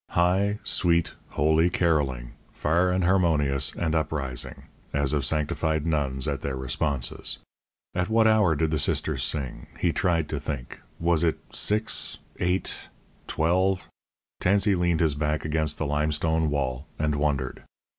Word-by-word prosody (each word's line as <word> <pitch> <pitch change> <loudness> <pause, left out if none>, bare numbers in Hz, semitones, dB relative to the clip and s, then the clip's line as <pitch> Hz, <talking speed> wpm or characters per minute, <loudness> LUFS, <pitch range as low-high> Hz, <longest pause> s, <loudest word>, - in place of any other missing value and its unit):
High, 95 +4 +3
sweet, 85 -2 +1 0.2
holy 80 +3 +3
carolling, 70 -9 0 0.2
far 85 +4 +1
and 90 0 +1
harmonious 75 -7 +2
and 80 -2 -1
uprising, 70 -6 -2 0.3
as 70 -1 +2
of 75 -2 +1
sanctified 75 +1 0
nuns 70 -4 0
at 70 -2 -2
their 70 - -3
responses. 65 0 -1 0.6
At 90 +2 -1
what 110 0 +4
hour 105 -7 +4
did 80 +1 0
the 80 - +1
Sisters - - +1
sing? 70 -5 -3
He - - +1
tried 85 -4 +1
to 75 - -2
think 70 -4 -6 0.2
was 85 -1 +2
it 80 -2 +2
six, 105 +1 +1 0.2
eight, 90 +1 -1 0.4
twelve? 90 +4 +1 0.5
Tansey 100 +2 +3
leaned 85 -2 +1
his 80 -3 +4
back 75 +1 -1
against 75 -1 0
the 80 - -2
limestone 75 +2 +1
wall 70 -1 -2
and 75 -1 0
wondered. 70 -4 -1
80 Hz, 140 wpm, -26 LUFS, 70-85 Hz, 0.6 s, what